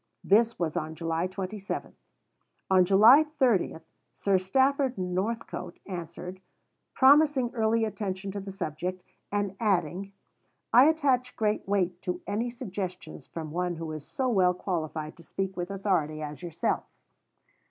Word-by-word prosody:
This 230 +3 +3
was 165 -3 -2
on 155 +1 -3
July 165 +1 -1
27. 195 +2 -5 0.8
On 185 -1 +6
July 220 - +7
30 260 - +1 0.4
Sir 195 -2 +2
Stafford 265 +6 +2
Northcote 185 0 -3
answered, 180 0 -7 0.5
promising 275 -2 +5
early 225 0 +2
attention 195 -2 -4
to 200 - -4
the 195 0 -7
subject, 180 0 -4 0.3
and 205 -2 -1
adding, 195 -2 0 0.6
"I 250 - +8
attach 265 -5 +1
great 215 -3 0
weight 185 -3 0
to 180 -1 -3
any 215 +5 -1
suggestions 195 -6 -6
from 160 -2 -6
one 175 +1 -1
who 165 -1 -5
is 155 -2 -6
so 260 - -2
well 185 -6 +3
qualified 155 -4 -3
to 170 - -14
speak 190 +3 -4
with 175 0 -4
authority 180 -6 -1
as 150 +1 -7
yourself." 170 -3 -2
190 Hz, 135 wpm, -28 LUFS, 175-225 Hz, 0.8 s, I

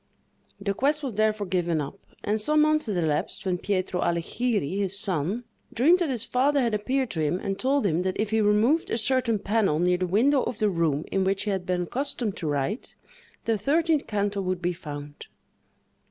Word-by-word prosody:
The 200 0 -1
quest 290 +7 0
was 265 -4 -3
therefore 215 0 +1
given 175 -3 0
up, 145 +7 -5 0.2
and 215 +1 0
some 305 +7 +3
months 305 -2 +2
had 205 -4 -1
elapsed, 155 0 -1
when 180 -2 0
Pietro 185 -2 -1
Allighieri, 185 - -1
his 195 -1 0
son, 195 +3 -1 0.3
dreamed 325 +10 +4
that 345 -4 0
his 240 -4 -1
father 280 +3 +2
had 235 -4 +1
appeared 255 +4 0
to 165 - -4
him 155 +3 +1
and 195 +1 -4
told 270 -1 +1
him 170 -2 +1
that 185 0 -2
if 215 0 -1
he 220 0 +2
removed 215 +10 +3
a - - 0
certain 240 -1 +2
panel 200 -5 +1
near 180 +2 +2
the 185 - 0
window 255 +9 +3
of 245 - -3
the 210 -2 +2
room 160 -4 0
in 195 - +1
which 195 +1 0
he 210 - -1
had 190 -2 -3
been 180 -1 0
accustomed 245 0 -3
to 165 - -4
write, 145 - -2 0.5
the 225 -2 +1
thirteenth 310 - +1
canto 205 -1 -1
would 185 -1 -2
be 175 0 -1
found. 145 -4 -8
205 Hz, 200 wpm, -26 LUFS, 180-245 Hz, 0.5 s, dreamed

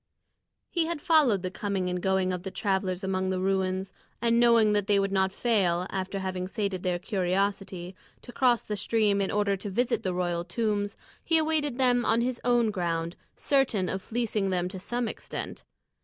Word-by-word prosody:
He 335 -2 +1
had 335 -2 -2
followed 285 - +3
the 185 - -3
coming 195 -2 -2
and 180 0 -2
going 190 -1 +1
of 180 - -3
the 190 - -5
travellers 190 -1 -1
among 190 0 -1
the 185 -1 -1
ruins, 190 0 0 0.3
and 235 0 +2
knowing 230 -3 +5
that 205 -1 +1
they 205 - +4
would 195 0 +1
not 190 -1 +2
fail, 190 -6 +1
after 190 +1 -3
having 185 -1 -3
sated 195 -2 -2
their 180 -1 0
curiosity, 190 -1 -1 0.3
to 245 - -10
cross 245 -2 +2
the 210 - -2
stream 205 -1 +2
in 195 - 0
order 205 -1 +1
to 200 +2 -6
visit 235 +5 0
the 185 - -1
royal 175 -1 -1
tombs, 205 +2 -1 0.3
he 330 - +3
awaited 310 -4 0
them 245 -2 +3
on 225 +1 +2
his 245 0 -2
own 240 -2 +3
ground, 170 -3 -2 0.2
certain 250 -10 +1
of 190 - -3
fleecing 220 -3 -1
them 180 -1 0
to 190 0 -7
some 240 +5 -2
extent. - - -6
195 Hz, 185 wpm, -28 LUFS, 185-235 Hz, 0.3 s, knowing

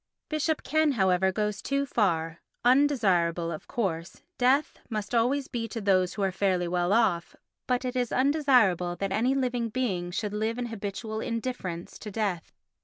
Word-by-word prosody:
Bishop 310 0 0
Ken, 310 -1 +2
however, 190 -3 +2
goes 210 0 -2
too 280 0 0
far. 170 -9 0 0.2
Undesirable, 190 - +3
of 155 - -7
course, 170 -7 -3 0.2
death 265 +4 +2
must 215 -2 -4
always 255 +4 +2
be 230 -2 -3
to 225 +1 -5
those 185 -3 +2
who 205 - -2
are 190 - +1
fairly 185 -2 0
well 175 +1 0
off, 200 -6 +2 0.3
but 250 0 0
it 250 0 -3
is 245 -2 0
undesirable 255 - +3
that 195 +2 -3
any 240 +7 +2
living 245 -3 0
being 205 -8 -2
should 205 +3 -3
live 220 +2 -1
in 245 - -2
habitual 220 +1 -5
indifference 230 -8 -4
to 210 - -7
death. 200 -5 -2
215 Hz, 165 wpm, -28 LUFS, 185-250 Hz, 0.3 s, Undesirable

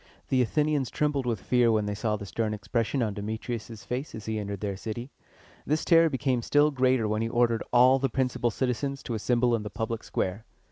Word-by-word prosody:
The 130 -1 +3
Athenians 145 +2 +1
trembled 145 -4 0
with 115 -4 0
fear 120 +1 +3
when 110 -2 +1
they 105 - -2
saw 105 +1 -1
the 105 - -6
stern 105 +1 -2
expression 115 +4 -1
on 105 -3 -1
Demetrius' 110 +2 -5
face 130 +4 -4
as 110 - -8
he 110 -1 -2
entered 100 -1 -4
their 100 -1 -3
city. 115 +6 -6 0.5
This 155 +2 -1
terror 165 -1 +6
became 130 -3 0
still 145 +5 +3
greater 130 -4 +2
when 105 +1 0
he 115 - -1
ordered 120 -1 +2
all 125 +2 +6
the 135 0 0
principal 125 -1 0
citizens 135 +3 -2
to 120 - -4
assemble 120 +2 +1
in 115 - +1
the 105 - -5
public 115 +1 -4
square. 95 +4 -2
120 Hz, 205 wpm, -27 LUFS, 110-130 Hz, 0.5 s, terror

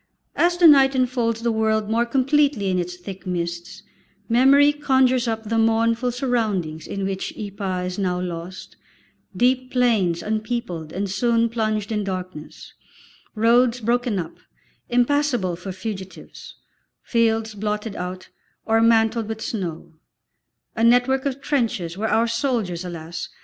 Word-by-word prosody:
As 350 0 +2
the 350 - +4
night 275 -3 +6
enfolds 240 -3 0
the 235 - +1
world 220 -1 0
more 230 +2 +1
completely 270 -4 +2
in 185 - 0
its 180 0 -4
thick 190 +1 -9
mists, 175 +2 -4 0.4
memory 275 +5 +5
conjures 260 -4 +2
up 225 -1 -2
the 225 +1 -1
mournful 230 +2 +2
surroundings 215 - -2
in 195 -1 -3
which 195 0 -4
Ypres 195 -3 -4
is 185 - -6
now 180 -2 0
lost, 180 +1 -7 0.6
deep 255 +3 +1
plains 220 -9 +1
unpeopled 215 -7 -3
and 200 +2 -3
soon 230 +4 +1
plunged 215 -2 -2
in 210 -1 -1
darkness, 185 -5 -7 0.6
roads 235 +2 +3
broken 240 -1 0
up, 170 -3 -5 0.5
impassable 245 -6 +1
for 185 +3 -7
fugitives, 190 0 -8 0.5
fields 225 -2 +1
blotted 210 +1 -3
out 180 +1 -6 0.4
or 225 0 +2
mantled 225 -1 +3
with 220 0 -5
snow, 180 -9 -5 0.8
a 225 - -1
network 250 +3 +3
of 275 0 -4
trenches 225 - -1
where 220 +3 -2
our 230 - +3
soldiers, 230 -7 -1
alas! 170 -1 -6
225 Hz, 135 wpm, -22 LUFS, 190-245 Hz, 0.8 s, night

